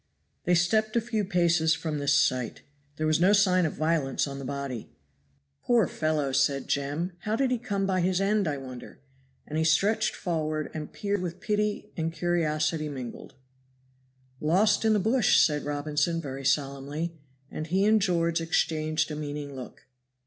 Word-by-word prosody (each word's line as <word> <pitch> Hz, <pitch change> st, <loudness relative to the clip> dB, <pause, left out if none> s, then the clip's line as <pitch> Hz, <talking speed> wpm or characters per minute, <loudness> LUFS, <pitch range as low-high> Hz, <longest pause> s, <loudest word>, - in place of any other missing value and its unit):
They 175 Hz, -, +4 dB
stepped 215 Hz, +6 st, +2 dB
a -, -, +5 dB
few 225 Hz, -2 st, -2 dB
paces 170 Hz, -3 st, +2 dB
from 155 Hz, -2 st, -3 dB
this 145 Hz, +1 st, +2 dB
sight. 130 Hz, -4 st, +1 dB, 0.3 s
There 155 Hz, -, -2 dB
was 155 Hz, 0 st, +2 dB
no 190 Hz, +3 st, +5 dB
sign 185 Hz, -4 st, +4 dB
of -, -, -5 dB
violence 155 Hz, -4 st, 0 dB
on 140 Hz, -1 st, -6 dB
the 135 Hz, -, -6 dB
body. 140 Hz, -3 st, -5 dB, 0.7 s
"Poor 235 Hz, -4 st, +3 dB
fellow!" 155 Hz, -3 st, -1 dB
said 140 Hz, 0 st, +1 dB
Jem. 145 Hz, +6 st, -1 dB
"How 215 Hz, +3 st, -2 dB
did 260 Hz, +1 st, +1 dB
he 250 Hz, -, +1 dB
come 200 Hz, -5 st, -2 dB
by 185 Hz, -1 st, +1 dB
his 180 Hz, +1 st, +1 dB
end, 200 Hz, -1 st, +1 dB
I 145 Hz, -2 st, -1 dB
wonder?" 130 Hz, -2 st, -9 dB, 0.5 s
And 155 Hz, +1 st, -3 dB
he -, -, +2 dB
stretched 200 Hz, +8 st, +2 dB
forward 155 Hz, -3 st, -2 dB
and 155 Hz, -1 st, -6 dB
peered 205 Hz, -2 st, -2 dB
with 180 Hz, 0 st, -5 dB
pity 210 Hz, 0 st, -1 dB
and 165 Hz, -1 st, -2 dB
curiosity 155 Hz, -2 st, 0 dB
mingled. 130 Hz, -4 st, -8 dB, 1.0 s
"Lost 185 Hz, +11 st, +3 dB
in 220 Hz, -, +4 dB
the 210 Hz, -, +3 dB
bush!" 225 Hz, +2 st, +3 dB
said 150 Hz, -3 st, +2 dB
Robinson, 150 Hz, +3 st, -1 dB
very 135 Hz, -3 st, -6 dB
solemnly. 145 Hz, +3 st, -1 dB, 0.4 s
And 155 Hz, -, -5 dB
he 190 Hz, +4 st, +2 dB
and 215 Hz, 0 st, +4 dB
George 170 Hz, -3 st, +1 dB
exchanged 160 Hz, -1 st, 0 dB
a -, -, -3 dB
meaning 145 Hz, -1 st, -5 dB
look. 130 Hz, -2 st, -10 dB
160 Hz, 170 wpm, -27 LUFS, 145-190 Hz, 1.0 s, a